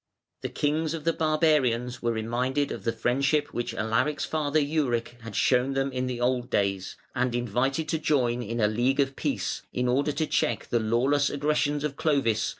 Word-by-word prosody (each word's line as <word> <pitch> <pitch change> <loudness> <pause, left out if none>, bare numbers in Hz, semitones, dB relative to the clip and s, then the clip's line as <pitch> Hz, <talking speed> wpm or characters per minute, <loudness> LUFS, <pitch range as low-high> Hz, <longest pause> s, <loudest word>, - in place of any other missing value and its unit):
The - - -3
kings 155 +2 0
of 160 - -7
the 165 +1 +2
barbarians 150 -7 +1
were 120 - +1
reminded 125 +5 -1
of - - -6
the 115 - +2
friendship 140 +6 0
which 120 - -3
Alaric's 115 +7 0
father, 155 -1 0
Euric, 130 -6 -1
had 115 -3 -8
shown 130 +4 +2
them 135 0 0
in 125 0 -2
old 125 0 0
days, 100 -3 -1 0.2
and 125 -1 0
invited 125 +6 0
to 160 - 0
join 125 -6 +1
in 115 +1 -4
a 105 - +4
"League 120 +6 +1
of 135 -1 +1
Peace", - - -2
in 125 0 -1
order 140 +4 +2
to 155 +2 -1
check 120 -7 0
the 120 - +2
lawless 130 +6 +2
aggressions 145 0 0
of 150 -2 -3
Clovis, - - -18
which - - -7
threatened 145 -3 +3
danger 110 -2 +2
to - - 0
all. - - -1
130 Hz, 205 wpm, -27 LUFS, 120-145 Hz, 0.2 s, a